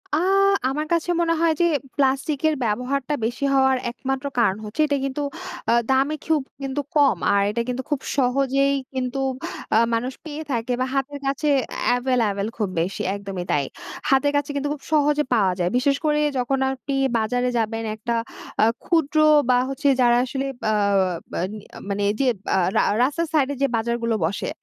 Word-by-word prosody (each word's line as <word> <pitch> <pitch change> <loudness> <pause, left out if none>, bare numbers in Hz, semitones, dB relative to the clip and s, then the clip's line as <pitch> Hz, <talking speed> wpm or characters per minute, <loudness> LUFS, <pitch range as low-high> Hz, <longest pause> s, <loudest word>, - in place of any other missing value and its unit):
আ - - +2 0.5
আমার 300 +3 -2
কাছে 335 +1 0
মনে 330 -1 +2
হয় 330 -1 +4
যে - - +5 0.3
প্লাস্টিকের 280 +3 +1
ব্যবহারটা 250 +6 -1
বেশি 245 +4 -2
হওয়ার 265 -1 +4
একমাত্র 270 +2 -4
কারণ 205 -4 +3
হচ্ছে 210 +9 -2
এটা 285 -1 +1
কিন্তু 275 +2 -3 0.5
আ - - +5 0.2
দামে 270 +3 +2
খুব 315 -3 +2 0.2
কিন্তু 270 +1 -2
কম 285 -2 +4 0.2
আর 200 - +4
এটা 235 +3 -1
কিন্তু 250 +1 -3
খুব 290 -3 0 0.2
সহজেই 275 +2 +2 0.2
কিন্তু 260 +1 -2 0.6
আ - - +6 0.2
মানুষ 250 +3 -1
পেয়ে 305 0 -6
থাকে 240 +1 -1
বা - - +2
হাতের 280 +1 -2
কাছে 280 +2 -1 0.5
এভেইলেবল 230 -5 0
খুব 210 -4 -1
বেশি 185 +3 -3
একদমই 195 -3 -5
তাই। 145 - +2 0.5
হাতের 270 +1 +3
কাছে 290 +1 -1
কিন্তু 285 +1 -1
খুব 285 - -10
সহজে 295 0 +3
পাওয়া 195 -5 +3
যায়। 175 0 +1
বিশেষ 275 +2 +2
করে 300 0 +2 0.2
যখন 265 +2 0
আপনি 270 +1 -5 0.2
বাজারে 245 +3 0
যাবেন 225 0 -1
একটা 235 +2 -2 0.5
আ - - +7 0.2
ক্ষুদ্র 320 -3 +1 0.3
বা 250 - +5
হচ্ছে 275 +1 -1
যারা 240 0 +5
আসলে 270 +2 -3 0.3
আ - - +2 0.7
আ - - 0 0.5
মানে 200 0 -1
এই - - +1
যে 265 - +2 0.3
আ - - +3 0.2
রা - - +5 0.2
রাস্তার 315 +5 0
সাইড 285 -4 +3
এ - - -6
যে 275 - +4
বাজারগুলো 230 0 -1
বসে 190 +4 -2
265 Hz, 175 wpm, -23 LUFS, 235-285 Hz, 0.7 s, আ